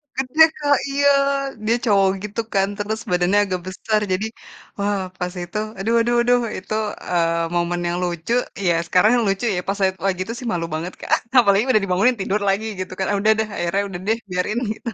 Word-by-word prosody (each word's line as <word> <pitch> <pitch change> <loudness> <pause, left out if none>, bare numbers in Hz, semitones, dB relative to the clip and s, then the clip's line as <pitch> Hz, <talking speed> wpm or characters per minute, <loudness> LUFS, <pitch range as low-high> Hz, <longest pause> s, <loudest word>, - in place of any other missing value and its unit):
Kan 265 - -1
dia 320 0 +9
Kak 290 -2 +3
iya, 285 +1 +2 0.6
dia 230 +2 +3
cowok, 195 -3 +4
gitu 210 +2 -5
kan. 195 0 +3
Terus 215 +2 -3
badannya 180 +3 +3
agak 185 -2 -2
besar 215 +3 -1
jadi, 190 +4 0 0.5
wah 200 0 0 0.2
pas 180 0 -3
itu, 175 +4 -6 0.2
aduh 225 +4 0
aduh 240 +1 +1
aduh 245 +1 +3 0.2
itu, 190 +3 -6 0.4
eee, 170 -1 +1
momen 175 0 0
yang 175 +1 -1
lucu, 175 +4 -2 0.3
ya 170 - +4
sekarang 185 +6 +4 0.2
lucu 195 +4 0
ya 180 - 0
pas 195 - 0
saya 190 -1 +3 0.2
lagi 185 -1 -1
itu 230 - -6
sih 250 - -6
malu 165 -1 -1
banget 170 +4 -4
Kak, - - -7 0.3
apalagi 200 -2 +4
udah 215 -3 +3
dibangunin, 195 +7 +2
tidur 195 +2 0
lagi 205 +3 0
gitu 185 0 -5
kan, 190 - 0
udah 215 +2 +4
deh 220 - 0
akhirnya 185 +4 0
udah 175 -2 -6
deh, 225 +1 +2
biarin 180 +5 -1 0.2
gitu. 235 - -6
195 Hz, 200 wpm, -21 LUFS, 180-220 Hz, 0.6 s, dia